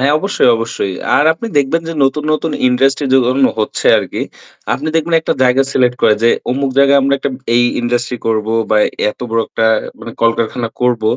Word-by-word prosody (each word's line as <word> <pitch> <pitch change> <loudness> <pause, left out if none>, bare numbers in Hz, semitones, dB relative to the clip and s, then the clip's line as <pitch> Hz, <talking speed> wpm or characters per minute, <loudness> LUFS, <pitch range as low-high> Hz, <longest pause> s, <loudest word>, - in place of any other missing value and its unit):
হ্যাঁ 140 +3 +2
অবশ্যই, 195 -7 +1
অবশ্যই। 115 -4 -3 0.2
আর 145 - +3
আপনি 165 +8 -7
দেখবেন 150 +4 0
যে - - -3
নতুন, 140 +3 0
নতুন 155 +1 -2 0.2
ইন্ডাস্ট্রি 135 +3 +1
যে 135 - +6
ধরুন 130 +1 +2
হচ্ছে 110 - -2
আরকি। - - -4 0.5
আপনি 150 +3 -4
দেখবেন 165 +1 0
একটা - - -1
জায়গা 130 +1 +3
সিলেক্ট 125 -1 +1
করে 105 - +5
যে 115 - +4 0.2
অমুক 135 +1 -1
জায়গায় 140 0 +5
আমরা 140 +1 +2
একটা 135 - -3 0.3
এই 120 - +4 0.2
ইন্ডাস্ট্রি 120 0 -2
করব 110 -1 0 0.2
বা 110 - +3 0.3
এত - - -17
বড় 115 - +1
একটা 110 - -1 0.3
মানে 115 - -8
কলকারখানা 115 0 0
করব, 120 -3 0
130 Hz, 190 wpm, -15 LUFS, 115-140 Hz, 0.5 s, যে